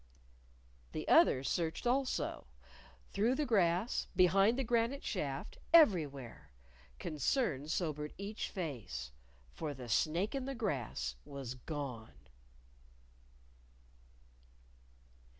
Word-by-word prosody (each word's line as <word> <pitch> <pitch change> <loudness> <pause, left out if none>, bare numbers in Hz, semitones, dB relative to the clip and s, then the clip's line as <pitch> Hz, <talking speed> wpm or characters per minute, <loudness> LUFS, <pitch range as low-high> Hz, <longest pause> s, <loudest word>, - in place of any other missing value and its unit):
The - - -4
others 130 +1 +5
searched 165 +6 -1
also 255 - 0 0.6
through 230 +6 +2
the 300 - 0
grass, 195 -2 +2
behind 195 +5 +5
the 270 - 0
granite 235 +3 +1
shift, 140 -8 -3
everywhere. 155 - +4 0.5
Concern 150 - 0
sobered 150 -3 -2
each 205 +2 -4
face. 110 - -5 0.4
For 150 -2 -4
the 125 -2 -8
snake 170 - +1
in 270 -2 -2
the 270 0 -4
grass 120 - -2
was 135 -3 -6
gone! 130 -4 -6
165 Hz, 95 wpm, -35 LUFS, 135-225 Hz, 0.6 s, others